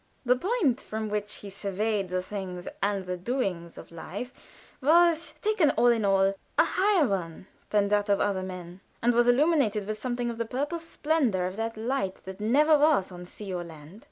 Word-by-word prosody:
The 250 +1 +4
point 335 - 0
from 220 0 -4
which 210 0 -2
he 200 - -8
surveyed 200 0 -2
the 185 0 -1
things 185 -2 -6
and 200 -1 0
the 180 0 -3
doings 180 -6 -3
of - - -11
life 200 +9 -7 0.5
was, 335 +3 +3
taken 420 -8 +3
all 245 - +5
in 230 -2 +2
all, 195 0 +3 0.2
a - - +7
higher 375 -6 +2
one 180 -4 -3 0.2
than 205 -1 +2
that 205 0 +1
of 200 - +3
other 200 -2 0
men, 180 -1 -8 0.2
and 240 +1 +4
was 240 +1 +3
illumined 275 -3 +3
with 210 +1 -4
something 240 -1 -2
of 230 - -9
the 230 - 0
purple 290 +8 -3
splendor 300 - 0
of 185 +1 -4
that 225 0 -3
"light 220 -4 -1
that 190 +1 -8
never 290 +8 +4
was 290 -12 +3
on 180 0 -9
sea 195 0 -7
or 175 -1 -3
land." 160 +3 -12
210 Hz, 190 wpm, -27 LUFS, 190-260 Hz, 0.5 s, a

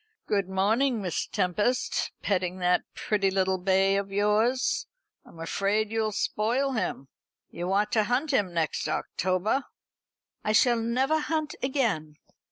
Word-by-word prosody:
"Good 200 -3 0
morning, 220 +7 +2
Miss 185 -4 -2
Tempest. 205 +8 0
Petting 185 -2 0
that 180 -1 +2
pretty 200 -2 +1
little 190 -1 +1
bay 195 +1 +3
of 200 0 -3
yours? 210 +5 +1 0.4
I'm 165 - -16
afraid 205 +6 0
you'll 220 -1 0
spoil 235 +6 0
him. 215 - -2 0.4
You 175 +2 -4
ought 205 +2 +1
to 215 -2 +2
hunt 255 +7 0
him 205 -9 +1
next 165 -2 -1
October." 185 - -1 0.8
"I 215 - 0
shall 240 +1 +4
never 260 +7 +1
hunt 310 -1 -2
again." 230 - -1
210 Hz, 135 wpm, -27 LUFS, 185-240 Hz, 0.8 s, shall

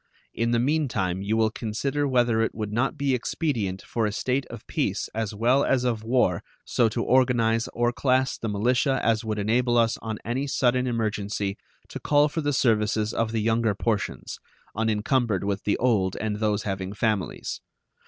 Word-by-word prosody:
In 115 0 0
the 120 - +2
mean 145 +5 +1
time 95 -6 -2
you 105 +3 0
will 110 -1 +2
consider 135 +7 -2
whether 120 -3 +2
it 115 - -1
would 105 -1 -4
not 130 +7 0
be 140 -2 +1
expedient 115 - -2
for 115 -2 -1
a - - -2
state 130 +5 -1
of 115 -2 -10
peace - - -2
as 110 -2 -3
well 125 +6 +3
as 130 -2 +2
of 115 -3 -1
war 115 -7 +2 0.2
so 115 -2 +2
to - - -2
organize 120 -3 +2
or 120 +1 0
class 130 0 +1
the 115 - -4
militia 125 +6 +1
as 115 -1 +2
would 110 -1 -3
enable 120 +4 +1
us 115 -1 +2
on 110 -1 -4
any 130 +5 -1
sudden 125 -1 +1
emergency 105 -4 -2 0.3
to - - -6
call 145 0 +3
for 160 - -3
the 145 -1 0
services 110 -4 +1
of 115 -1 0
the 115 -1 -1
younger 115 -1 +1
portions, 105 0 -2 0.4
unencumbered 110 -1 +1
with 100 0 -2
the 105 - +1
old 105 -7 +1
and 110 -1 -2
those 105 -1 0
having 95 -1 -3
families. 105 -3 -2
115 Hz, 185 wpm, -25 LUFS, 105-125 Hz, 0.4 s, well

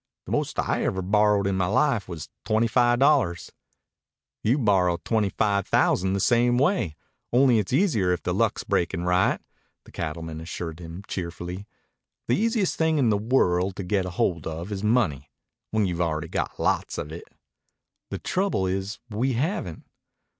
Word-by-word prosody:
"The - - -8
most - - -1
I - - 0
ever 95 0 -1
borrowed 105 +1 +3
in 100 - +1
my 95 -2 +1
life 115 +2 +1
was 80 -4 -6 0.2
twenty 110 +2 +2
five 120 +1 +3
dollars." 130 - +2 0.9
"You 120 +6 +3
borrow 95 - +2
twenty 105 +3 0
five 100 -1 0
thousand 95 +1 +2
the 100 - 0
same 120 +3 +3
way, 140 - +1 0.4
only 125 -2 +5
it's 100 - -3
easier 125 - +2
if 90 - -1
the - - -1
luck's - - 0
breakin' 85 0 -1
right," 90 +1 +2 0.4
the - - -17
cattleman 80 0 -5
assured 80 0 -6
him 85 +3 -8
cheerfully. 90 +2 -5 0.6
"The 120 - +3
easiest 225 -3 0
thing 160 -1 +2
in 125 -6 +3
the - - +3
world 95 -5 +1
to 100 - -5
get 95 +1 0
hold 90 -2 -1
of 80 +5 -5
is 100 0 -4
money 90 - +1 0.4
when 110 -1 +1
you've 90 -2 -2
already 80 -3 -1
got - - -3
lots - - 0
of 75 - -5
it." 85 - -8 0.8
"The - - -4
trouble 190 - 0
is 95 +2 -2
we 125 +6 0
haven't." 120 - -2
100 Hz, 170 wpm, -25 LUFS, 90-120 Hz, 0.9 s, only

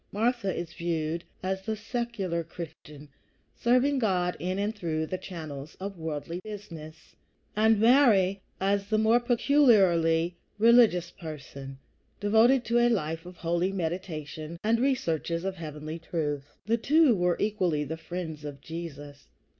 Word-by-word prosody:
Martha 225 -1 0
is 170 -1 -5
viewed 165 -1 -2 0.2
as 190 +1 -1
the 220 +3 -3
secular 215 -7 -3
Christian, 155 -3 -10 0.5
serving 255 +4 +3
God 180 -6 +1
in 185 +2 -2
and 205 +2 -1
through 160 -5 -2
the 185 +3 -4
channels 155 -6 -8
of 195 +1 -5
worldly 160 +2 -4
business, 170 -7 -10 0.4
and 220 0 +4
Mary 215 -6 +5 0.2
as 200 +1 0
the 215 - +2
more 220 +2 +4
peculiarly 195 - +3 0.2
religious 220 -6 +5
person, 140 -5 -9 0.4
devoted 225 +5 +4
to 235 +1 +2
a 240 0 +4
life 165 -6 -1
of 180 -1 -11
holy 175 +2 0
meditation 160 -3 -4
and 225 +2 +2
the - - -1
researches 170 - 0
of 190 -1 -3
heavenly 155 0 -6
truth. 150 -4 -3 0.2
The 225 +3 +2
two 290 +1 +4
were 180 -2 +1
equally 185 -8 0
the 155 +3 -4
friends 165 -2 -6
of 145 -2 -7
Jesus. 145 -3 -8
180 Hz, 140 wpm, -28 LUFS, 160-220 Hz, 0.5 s, Mary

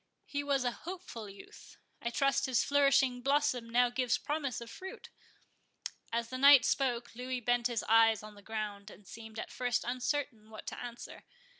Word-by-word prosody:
He 285 0 -3
was 280 -2 +1
a 245 - +1
hopeful 320 - -8
youth; 195 0 -14 0.2
I 235 - -1
trust 275 +3 +1
his 250 -3 +2
flourishing 275 -3 +3
blossom 275 -3 +1
now 245 +1 +3
gives 250 -1 +1
promise 290 -4 -3
of 235 -1 -9
fruit?" 380 +10 -9 1.0
As 230 0 -1
the 255 +1 -5
knight 280 -1 +8
spoke, 245 -4 0
Louis 250 +1 -4
bent 245 0 +1
his 235 -3 -2
eyes 225 -1 +5
on 215 0 -10
the 205 - -15
ground, 210 -1 -5
and 205 - -15
seemed 220 -1 -10
at - - -5
first 245 -2 -1
uncertain 250 -3 -2
what 215 - -10
to - - -6
answer. 240 -1 -9
245 Hz, 175 wpm, -32 LUFS, 225-275 Hz, 1.0 s, knight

